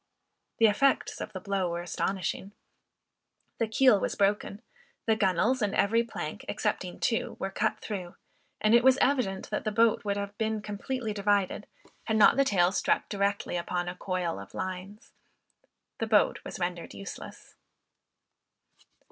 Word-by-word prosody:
The 225 - +5
effects 260 +6 +2
of - - -5
the 190 - -6
blow 195 -1 -1
were 170 0 -3
astonishing. 190 +2 -3 1.1
The 230 - +1
keel 220 -1 +5
was - - -2
broken, 205 +2 0 0.4
the 225 - +3
gunwales, 210 +5 +2
and 205 -1 0
every 230 +3 +3
plank, 235 - -6
excepting - - -2
two, - - 0
were - - -3
cut - - 0
through, 185 -4 -5 0.4
and 215 +1 +3
it 235 0 +6
was 260 0 +6
evident 250 -10 0
that 210 - -1
the 215 - -1
boat 225 +1 +3
would 200 -1 -1
have 200 0 -4
been 220 -1 0
completely 215 +2 -3
divided, 205 0 0 0.4
had 220 - +1
not 215 - +7
the 275 - +4
tail 185 -8 +3
struck - - 0
directly 200 -2 -1
upon 175 +1 -2
a 175 - -3
coil 180 - -2
of 100 0 -11
lines. 185 +3 -6 0.9
The 225 - -1
boat 215 -2 +3
was - - -7
rendered 175 - -4
useless. 100 0 -9
205 Hz, 155 wpm, -29 LUFS, 185-220 Hz, 1.1 s, not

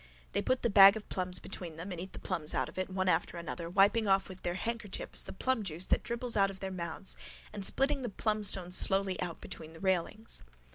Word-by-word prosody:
They - - 0
put 255 0 0
the 235 - +2
bag 195 0 +9
of 215 - -10
plums 180 -1 -1
between 175 -4 -6
them 175 +5 -7
and 175 -2 -5
eat 190 - -7
the - - -11
plums 165 -5 -2
out - - 0
of - - -8
it, 185 - -2
one 190 0 -1
after 180 - +1
another, 170 0 -5
wiping 205 +4 +3
off 195 0 +2
with 185 -1 -10
their 175 0 -2
handkerchiefs 225 0 -2
the - - -4
plumjuice 195 -8 -1
that - - +3
dribbles 235 0 -1
out 195 -1 +4
of 195 -1 -9
their 190 0 -4
mouths 175 +1 -1 0.4
and 205 -2 -5
spitting 275 +7 +2
the 245 - -3
plumstones 200 -4 +1
slowly 195 -1 +4
out 175 -2 -4
between 160 0 -8
the 165 - -12
railings. 190 +4 -1
190 Hz, 225 wpm, -32 LUFS, 180-210 Hz, 0.4 s, bag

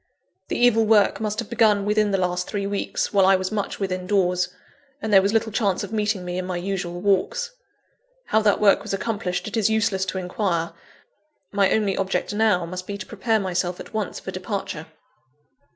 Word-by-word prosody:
The - - -2
evil 240 -2 +4
work 210 -2 +4
must 210 -1 -2
have 235 - -3
been 235 - -7
begun 210 -3 +4
within 210 0 +2
the 195 - +1
last 180 -1 -1
three 200 -2 -3
weeks, 200 +1 -2
while 195 -2 +5
I 195 - +6
was 185 +1 -2
much 205 -2 -3
within 185 -2 -3
doors, 180 -2 +2 0.5
and 220 -7 -3
there 195 - +8
was 200 +1 +1
little 220 0 +1
chance 200 -3 0
of 200 - -7
meeting 210 -3 0
me 180 0 -3
in 185 - -3
my 180 -1 -2
usual 175 -1 -3
walks. 205 - +1 0.7
How 220 - +2
that 210 -2 +3
work 205 -2 +5
was - - -3
accomplished 200 -3 -3
it 210 - -5
is 220 -2 +2
useless 215 -3 +1
to 185 0 -4
inquire; 180 -2 -1 0.8
my 200 -1 +3
only 205 -3 +1
object 195 +1 -1
now, 205 -5 +2
must 185 +2 -6
be 200 - -4
to 190 - -7
prepare 220 +1 0
myself 180 -2 -2
at - - -10
once 215 -2 -3
for 190 - -7
departure. 185 -4 -4
200 Hz, 200 wpm, -23 LUFS, 185-215 Hz, 0.8 s, there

